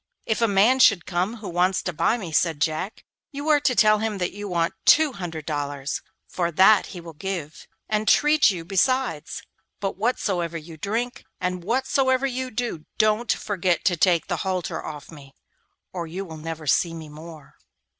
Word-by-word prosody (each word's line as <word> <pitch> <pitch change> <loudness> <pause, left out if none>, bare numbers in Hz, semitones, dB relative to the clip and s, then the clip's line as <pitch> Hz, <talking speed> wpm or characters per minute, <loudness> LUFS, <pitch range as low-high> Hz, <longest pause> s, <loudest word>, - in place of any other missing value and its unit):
'If 220 +1 -1
a 230 - +4
man 210 +6 +4
should 200 -8 +5
come 185 +5 -1
who 215 -3 -9
wants 180 +2 +1
to 180 - -3
buy 225 +9 +1
me,' 185 -8 -7
said 160 -1 +1
Jack, 160 +7 -2 0.3
'you 285 +1 -6
are 300 -1 +5
to 255 -3 +1
tell 215 -2 +5
him 220 -1 -2
that 180 -2 -2
you 205 +1 -7
want 170 -1 0
two 310 -3 +5
hundred 165 -7 -6
dollars, 145 -2 -3 0.3
for 170 -2 -2
that 190 +5 +5
he 180 - -8
will 165 -1 -10
give, 165 -2 -6 0.2
and 215 0 -1
treat 300 +3 +5
you 175 -5 -4
besides; 195 - 0 0.4
but 195 -2 -3
whatsoever 190 -7 -1
you 160 +1 -10
drink, 230 - -3 0.2
and 180 -1 -2
whatsoever 260 +4 +1
you 260 -1 -2
do, 230 -9 -4
don't 215 +2 +2
forget 185 -4 -1
to 180 - +3
take 170 +1 +3
the - - -2
halter 185 -3 -3
off 150 0 -8
me, 140 -4 -14 0.6
or 170 -2 -4
you 185 +5 -5
will 160 -3 -9
never 160 0 -6
see 165 +5 +2
me 160 -1 -8
more. 155 0 -12
185 Hz, 185 wpm, -24 LUFS, 165-220 Hz, 0.6 s, should